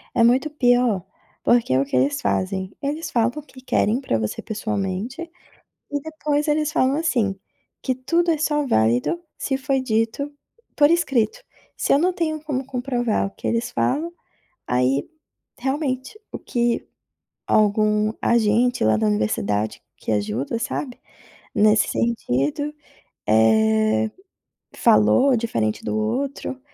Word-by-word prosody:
é 230 - +4
muito 255 +6 +3
pior. 245 - +2 0.4
Porque 235 - +3
é 130 - +4
o - - 0
que 140 - -4
eles 135 +3 +2
fazem: 190 0 -1
eles 300 +4 -3
falam 230 -1 +2 0.2
que 260 - -14
querem 250 -1 +1
pra 115 - 0
você 110 -1 -3
pessoalmente, 215 - -3 0.7
e 285 0 -1
depois 300 -1 -2
eles 305 0 +1
falam, 270 -4 +2
assim, 240 -12 +1 0.5
que 260 - 0
tudo 335 +7 +1
é 315 - +1
só 295 -1 +1
válido 120 - +2 0.2
se 270 - -1
foi 270 0 0
dito 225 +4 -1 0.5
por 290 -1 +5
escrito. 270 - +1 0.4
Se - - +2
eu 280 - +4
não 365 +3 +2
tenho 315 -3 -2
como 270 -4 -3
comprovar 245 -5 -1
o - - -10
que - - -6
eles 235 +1 -1
falam, 300 +7 0 0.6
aí 125 +3 +1 0.5
realmente 265 - -2
o - - -6
que 240 -1 -1 0.6
algum 215 0 +2
agente 235 +2 +2
lá 110 0 +4
da 110 0 +1
universidade 105 0 0 0.2
que - - -6
ajuda, 105 - -1
sabe, 255 +1 -4 0.6
nesse 210 0 +4
sentido, 230 - -1 0.6
eh, 110 0 +3 0.7
falou 110 - +4
diferente 115 - -1
do 105 0 -1
outro, 265 - -2
235 Hz, 135 wpm, -22 LUFS, -, 0.7 s, por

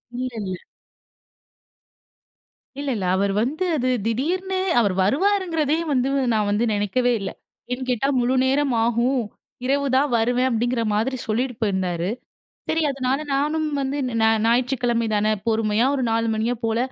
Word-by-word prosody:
இல்ல, 255 +1 -2
இல்ல. 185 -2 -4 2.2
இல்ல 285 0 -3
இல்ல. 195 -4 -3
அவர் 200 +1 +1
வந்து 290 +10 -1
அது 255 -1 0 0.2
திடீர்னு 360 - -1 0.2
அவர் 205 -5 +2
வருவாருங்கிறதையும் 325 - +1
வந்து 260 0 +1 0.2
நான் 210 -2 +1
வந்து 210 +3 +1
நினைக்கவே 205 +5 +1
இல்ல. 195 - -4 0.4
ஏன் 255 +1 -4
கேட்டா 250 +2 +1
முழு 245 +2 +1
நேரம் 270 0 +1
ஆகும் 240 +3 +1 0.4
இரவு 280 +2 +1
தான் 285 +2 +3
வருவேன் 245 +3 +2
அப்படிங்கிற 240 0 0
மாதிரி 225 +6 0
சொல்லிட்டு 245 +3 -1
போயிருந்தாரு. 185 -4 -1 0.6
சரி 320 0 +1
அதனால 265 0 -1 0.2
நானும் 305 +3 0
வந்து 270 +2 -2 0.2
நா 220 - +5 0.2
ஞாயிற்றுக்கிழமைதான 235 -3 +1 0.2
பொறுமையா 220 0 +2
ஒரு 270 - -1
4 230 0 +1
மணியா 225 +3 0
போல 225 0 +1
245 Hz, 135 wpm, -23 LUFS, 220-275 Hz, 2.2 s, நா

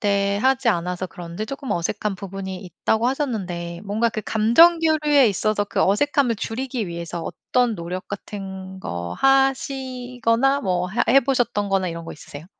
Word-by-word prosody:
때 200 -1 +1
하지 265 -1 +3
않아서 180 -1 -1
그런지 175 +4 -7
쪼끔 275 -2 -6
어색한 205 +3 -1
부분이 190 -1 -6
있다."고 220 +5 -1
하셨는데 185 - -3
뭔가 215 +4 +1
그 220 -1 -4
감정 235 +11 +5
교류에 300 -5 +4
있어서 210 +1 0
그 - - -2
어색함을 250 +4 +2
줄이기 240 0 -3
위해서 170 0 -5
어떤 235 +8 0
노력 180 +1 -6
같은 190 -2 -7
거 85 - -5
하시거나 265 -1 +1
뭐 180 -2 0
하 195 - 0
해 270 +3 +7
보셨던 240 -6 0
거나 195 -1 +1
이런 170 0 -6
거 - - -7
있으세요? 150 +1 -11
210 Hz, 345 characters per minute, -22 LUFS, 185-255 Hz, -, 해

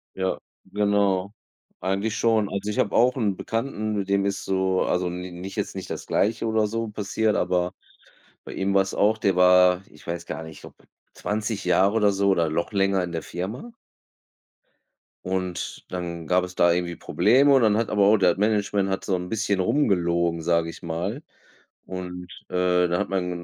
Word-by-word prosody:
Ja, 95 0 -1 0.3
genau. 100 -1 +1 0.5
Eigentlich 100 +3 -1
schon. 110 -3 +2
Also, 100 +1 -3
ich 105 - -3
habe - - +1
auch 125 +2 +4
'n 105 -7 0
Bekannten 110 0 -3
mit 100 -1 -3
dem 100 0 +2
ist 100 0 -2
so 95 -1 +1
also, 90 0 0
n 90 0 -6
nicht 95 +1 -7
jetzt - - -3
nicht - - -6
das - - -5
Gleiche 115 +3 0
oder 110 -1 +1
so 115 +2 -3
passiert, 105 +1 -1
aber 90 0 0 0.7
bei - - -9
ihm 95 +1 -1
war 95 - +5
es 95 - -7
auch. 110 +2 +2
Der 100 -4 +1
war, 90 0 +5
ich 75 - -18
weiß 85 0 -5
gar 80 - -5
nicht, 80 -1 -11
ob - - -12 0.4
20 105 -1 -3
Jahre 95 +4 +3
oder 105 -2 +4
so 100 0 +1
oder 85 -4 +2
noch 85 +5 -2
länger 95 -1 +2
in 90 - -4
der 80 -1 -4
Firma 105 - -6 1.5
und 90 -1 -3
dann 85 -2 -5
gab 90 0 +3
es 90 0 -6
da 85 0 +4
irgendwie 85 -1 -2
Probleme. 140 +3 +3
Und, 135 - +4
dann 110 -2 +3
hat 115 0 0
aber 105 -1 +2
auch 105 +2 +5
der 90 -3 +3
Management 105 -1 +1
hat 95 - -3
so 95 - +1
'n 90 0 -5
bisschen 100 -3 0
rum 145 +10 +2
gelogen, 85 -3 +1
sage 85 0 +1
ich 80 - -11
mal 90 - -3 0.6
und, 90 -1 -7 0.2
äh, 90 0 +2
da 85 0 0
hat - - -2
mein 90 -2 -1
95 Hz, 190 wpm, -24 LUFS, 90-105 Hz, 1.5 s, war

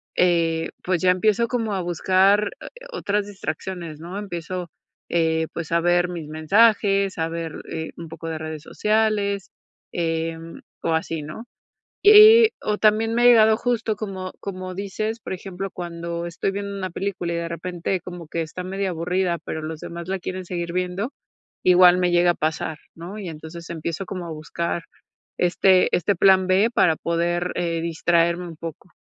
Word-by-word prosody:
eh, 165 -2 +2
pues, 180 -2 0
ya 185 - +4
empiezo 215 +5 +2
como 225 -3 -1
a 190 - -1
buscar, 190 +4 +3
eh - - -8 0.3
o - - -4
otras 205 0 0
distracciones, 170 -3 -6
¿no? 175 +4 -7
Empiezo, 180 -2 -5 0.4
eh, 160 -1 +1
pues, 165 -1 -5
a 170 - +3
ver 175 +1 +2
mis 165 -4 -6
mensajes, 195 +4 +3
a 160 0 0
ver, 165 -1 -4 0.2
eh, 160 0 -4
un 170 - -7
poco 165 0 -7
de 160 - -3
redes 155 -1 -6
sociales, 210 -2 0 0.4
em, 165 -1 -3 0.2
o 165 - +1
así, 160 -1 -1
¿no? 155 +10 -8 0.6
Y 410 - +7 0.3
y, 440 - +3
o 210 -1 -1
también 220 +1 +3
me 240 +1 +2
ha - - +5
llegado 220 -2 +7
justo 230 -3 -1
como 190 -3 -5
como 185 -2 -6
dices, 210 +4 -3
por 195 - -6
ejemplo, 190 +1 -6
cuando 170 -1 -5
estoy 170 +3 -2
viendo 200 0 -4
una 190 -1 -3
película 185 -2 -3
y - - -2
de 170 0 -3
repente 175 +2 -3
como 175 -2 -9
que 165 - -2
está 165 +3 -6
medio 195 +1 -2
aburrida, 175 +1 -1
pero 160 - -4
los 155 0 -6
demás 170 0 -7
la 190 0 -2
quieren 185 +1 -5
seguir 170 -1 -4
viendo, 185 +6 -2 0.5
igual 180 0 +7
me 180 -1 +1
llega 175 0 +4
a - - -1
pasar, 160 0 -2 0.2
¿no? 175 +6 -8
Y 195 - -6
entonces 160 +2 -9
empiezo 170 +2 -4
como 185 -2 -6
a - - -6
buscar 165 +2 -3 0.5
este 185 +1 +3
este 180 +3 +1
plan 190 0 +5
B 190 +4 +4
para 165 -7 +4
poder, 175 +2 -1
eh, 170 -2 -1
distraerme 170 +1 +1
un 165 - -9
poco. 165 +2 -8
180 Hz, 180 wpm, -23 LUFS, 165-195 Hz, 0.6 s, Y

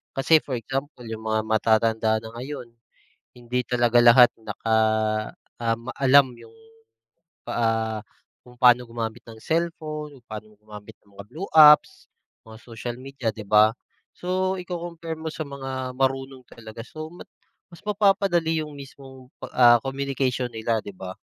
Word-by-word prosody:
Kasi 145 +4 +5
for 135 - -5
example 135 +2 -5
yung 110 0 -7
mga 110 0 +1
matatanda 110 0 +2
na 110 - -9
ngayon, 130 -1 -7 0.7
hindi 120 +1 -2
talaga 120 -1 +2
lahat 120 +1 +8
naka 110 0 -2 0.9
um, 115 0 -1
alam 135 -1 +5
yung, 115 -1 -16 1.0
ah, 110 -1 0 0.5
kung 125 0 -16
paano 125 0 +6
gumamit 115 -1 -5
ng 115 - -10
cellphone, 155 -3 -3
kung - - -41
paano 110 0 -9
gumamit 105 0 -13
ng 100 - -26
mga 100 - -8
blue 165 - -7
apps, 155 +5 +6 0.4
mga 110 0 -12
social 120 0 -7
media, 135 -2 -5
di 105 - -8
ba? 105 +1 +5 0.5
So, 185 +1 -1
iko-compare 170 -2 -6
mo 160 0 -5
sa 155 - -5
mga 135 -2 -5
marunong 135 0 -1
talaga, 110 -1 -11
so 155 0 -8 0.6
mas 170 - -14
mapapadali 195 -6 +1
yung 150 - -10
mismong, 135 -2 -13 0.3
ah, 120 -1 +7
communication 135 -2 -2
nila, 110 0 -1
di - - -7
ba? 95 0 -7
125 Hz, 140 wpm, -24 LUFS, 115-150 Hz, 1.0 s, lahat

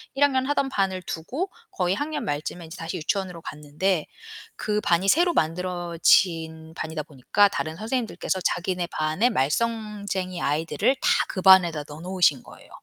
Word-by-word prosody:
1 285 - +3
학년 260 -2 +3
하던 280 -2 +1
반을 190 -5 -1
두고 275 - -4 0.2
거의 180 0 0
학년 300 +4 -3
말쯤에 150 +4 -3
인제 160 +3 -10
다시 165 +3 -5
유치원으로 180 +1 -2
갔는데 155 +4 -2 0.5
그 210 0 -1
반이 180 +3 +2
새로 345 - +4
만들어진 165 -1 +1
반이다 160 -1 -4
보니까 160 +8 +2
다른 160 -4 -3
선생님들께서 220 -3 -2
자기네 180 0 -1
반의 155 +10 +1
말썽쟁이 200 - -1
아이들을 165 - +1
다 - - +2 0.2
그 185 - -3
반에다 175 -5 +6
넣어 150 +2 -9
놓으신 180 -7 +2
거예요. - - -15
180 Hz, 355 characters per minute, -25 LUFS, 160-210 Hz, 0.5 s, 반에다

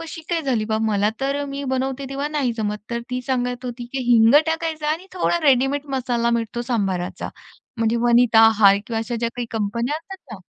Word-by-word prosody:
कशी 325 0 -8
काय 335 -2 0
झाली 245 -6 0
बा. 220 0 -1
मला 210 -1 +1
तर 280 +1 -1
मी 280 0 -5
बनवते 265 +1 -2
तेव्हा 280 +2 -2
नाही 285 -6 -1
जमत. 210 -1 -2
तर 235 - -2
ती 250 0 -2
सांगत 250 -1 -2
होती 245 0 -5
की 265 -1 -2
"हिंग 225 +3 +6
टाकायचं 320 -1 -2
आणि 325 +5 -2
थोडा 350 -1 0
रेडीमेड 275 +1 +2
मसाला 240 -2 0
मिळतो 235 0 -2
सांभाराचा." 195 -7 -2 0.5
म्हणजे 225 +1 +1
वनिता 235 -1 +5
आहे 200 -2 +5
किंवा 225 -1 -2
अशा 235 +1 -3
ज्या 230 0 -1
काही 245 -1 -3
कंपन्या 235 +6 -2
असतात 380 +4 -10
ना 190 -4 -10
245 Hz, 195 wpm, -22 LUFS, 225-280 Hz, 0.5 s, हिंग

